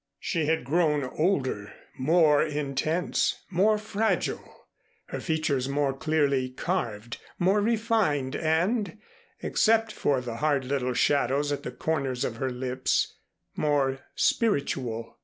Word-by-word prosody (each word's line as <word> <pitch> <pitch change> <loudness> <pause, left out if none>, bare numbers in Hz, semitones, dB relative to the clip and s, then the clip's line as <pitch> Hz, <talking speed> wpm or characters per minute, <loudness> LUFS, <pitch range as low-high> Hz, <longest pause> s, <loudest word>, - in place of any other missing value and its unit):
She 160 -4 -1
had 160 -2 +1
grown 150 +1 +2
older, 130 - -1 0.2
more 150 +1 +4
intense, 150 +3 -1
more 205 +4 +3
fragile, 215 +1 -2 0.4
her - - -4
features 155 -5 0
more 140 -1 +1
clearly 140 -3 +1
carved, 120 - -3 0.2
more 190 +4 +3
refined 215 - +1
and 180 +5 0 0.5
except 225 0 +2
for 140 -9 +1
the 120 -2 -5
hard 145 -2 +1
little 125 -2 -1
shadows 145 +1 +2
at 145 - -2
the - - -5
corners 135 -3 -1
of 115 - -4
her 130 +2 -1
lips 130 +1 -1 0.4
more 140 -3 +1 0.2
spiritual. 130 - 0
145 Hz, 120 wpm, -27 LUFS, 130-175 Hz, 0.5 s, more